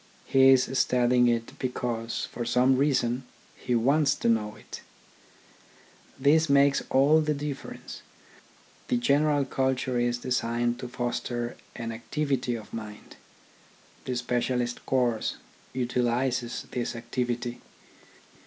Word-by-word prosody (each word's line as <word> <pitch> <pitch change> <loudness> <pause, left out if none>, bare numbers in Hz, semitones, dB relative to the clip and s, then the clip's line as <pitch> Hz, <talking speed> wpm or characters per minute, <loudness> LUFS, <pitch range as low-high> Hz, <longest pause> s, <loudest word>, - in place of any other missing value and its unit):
He 135 0 +5
is 130 -1 +5
studying 125 -1 +3
it 115 -1 -1
because, 120 -2 -2
for 120 - -4
some 125 +2 +3
reason, 130 -2 +1 0.3
he 125 - -2
wants 140 +5 +3
to - - -2
know 105 -2 0
it. - - -10 1.4
This 155 +3 +4
makes 140 0 +4
all 145 +4 +5
the 150 -1 0
difference. 145 -1 -6 0.9
The - - +1
general 145 +3 +2
culture 130 -1 0
is 120 0 +1
designed 120 -1 -1
to 125 - -5
foster 120 -1 -3 0.2
an 115 -1 -4
activity 130 +1 -2
of 110 -2 -10
mind; 105 -2 -8 0.9
the 125 - -2
specialist 120 0 -1
course 125 -4 0 0.4
utilises 125 0 -1
this 120 -1 -3
activity. 120 +1 -3
125 Hz, 115 wpm, -27 LUFS, 120-135 Hz, 1.4 s, He